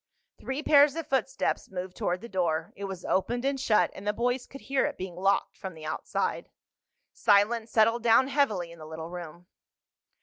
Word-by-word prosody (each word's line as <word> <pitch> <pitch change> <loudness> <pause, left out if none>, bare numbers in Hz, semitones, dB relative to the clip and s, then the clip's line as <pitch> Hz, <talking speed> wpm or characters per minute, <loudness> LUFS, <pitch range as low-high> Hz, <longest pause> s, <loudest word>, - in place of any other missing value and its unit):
Three 265 +3 -4
pairs 290 -1 +6
of 330 -1 -4
footsteps 270 -2 -1
moved 185 -1 -6
toward 180 +1 -1
the 235 - -8
door. 175 -6 -1
It 200 - -6
was 190 -2 -7
opened 240 +6 0
and 275 0 0
shut, 220 -5 +3
and 200 - -9
the 210 - +2
boys 245 +3 -1
could 275 - -11
hear 270 0 0
it - - -6
being 185 -2 -6
locked 195 +2 +1
from 190 -3 -7
the 155 -1 -10
outside. 155 - -2 0.6
Silence 220 +2 +3
settled 230 +2 +3
down 230 +3 +5
heavily 215 - +1
in 170 - -13
the 155 - -9
little 160 +1 -7
room. 175 -1 -8
210 Hz, 190 wpm, -28 LUFS, 180-260 Hz, 0.6 s, pairs